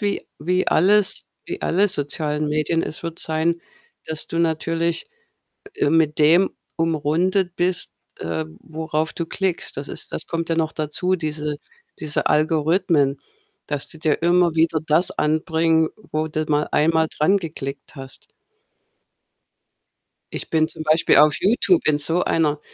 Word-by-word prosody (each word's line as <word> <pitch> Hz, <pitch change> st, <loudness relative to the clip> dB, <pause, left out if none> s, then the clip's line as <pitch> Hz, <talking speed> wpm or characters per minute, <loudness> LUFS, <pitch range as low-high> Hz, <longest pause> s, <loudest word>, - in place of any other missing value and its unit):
wie 205 Hz, -1 st, -1 dB, 0.2 s
wie 180 Hz, +5 st, 0 dB
alles 200 Hz, +3 st, +4 dB, 0.2 s
wie -, -, -5 dB
alle 200 Hz, +5 st, +3 dB
sozialen 150 Hz, -1 st, -1 dB
Medien, 155 Hz, +2 st, 0 dB
es 155 Hz, -, -5 dB
wird 165 Hz, -1 st, -6 dB
sein, 165 Hz, +2 st, -1 dB, 0.5 s
dass 155 Hz, -1 st, -2 dB
du 165 Hz, -, -4 dB
natürlich, 165 Hz, -, 0 dB, 0.7 s
äh, 145 Hz, -, +1 dB
mit 160 Hz, -1 st, +2 dB
dem 165 Hz, +5 st, +5 dB, 0.3 s
umrundet 165 Hz, +4 st, +1 dB
bist, 175 Hz, 0 st, 0 dB, 0.3 s
äh, 80 Hz, -1 st, -3 dB
worauf 160 Hz, 0 st, -3 dB
du 170 Hz, -, -3 dB
klickst. 185 Hz, +1 st, -1 dB
Das 140 Hz, -, -4 dB
ist -, -, -6 dB
das -, -, -3 dB
kommt 165 Hz, 0 st, -3 dB
ja 165 Hz, -, +1 dB
noch 160 Hz, -1 st, 0 dB
dazu, 165 Hz, +4 st, -1 dB
diese 150 Hz, -2 st, -3 dB, 0.4 s
diese 150 Hz, -1 st, -1 dB
Algorithmen, 155 Hz, -2 st, +2 dB, 0.5 s
dass 145 Hz, -2 st, -2 dB
die 160 Hz, -, -8 dB
dir 155 Hz, 0 st, 0 dB
immer 175 Hz, -1 st, +3 dB
wieder 160 Hz, 0 st, +2 dB
das 160 Hz, +4 st, +2 dB
anbringen, 160 Hz, +1 st, +1 dB, 0.2 s
wo 155 Hz, +1 st, -1 dB
du 155 Hz, 0 st, -2 dB
mal 150 Hz, 0 st, +1 dB
einmal 160 Hz, +1 st, +3 dB
dran 190 Hz, +7 st, +2 dB
geklickt 140 Hz, -5 st, -7 dB
hast. 135 Hz, -1 st, -8 dB, 2.1 s
Ich -, -, -5 dB
bin 160 Hz, -1 st, +2 dB
zum 155 Hz, -, -7 dB
Beispiel 155 Hz, +1 st, +3 dB
auf 150 Hz, +1 st, +6 dB
YouTube 245 Hz, -, +3 dB
in 150 Hz, -1 st, +3 dB
so 165 Hz, +4 st, +1 dB
einer 150 Hz, -2 st, +1 dB
160 Hz, 145 wpm, -21 LUFS, 150-170 Hz, 2.1 s, auf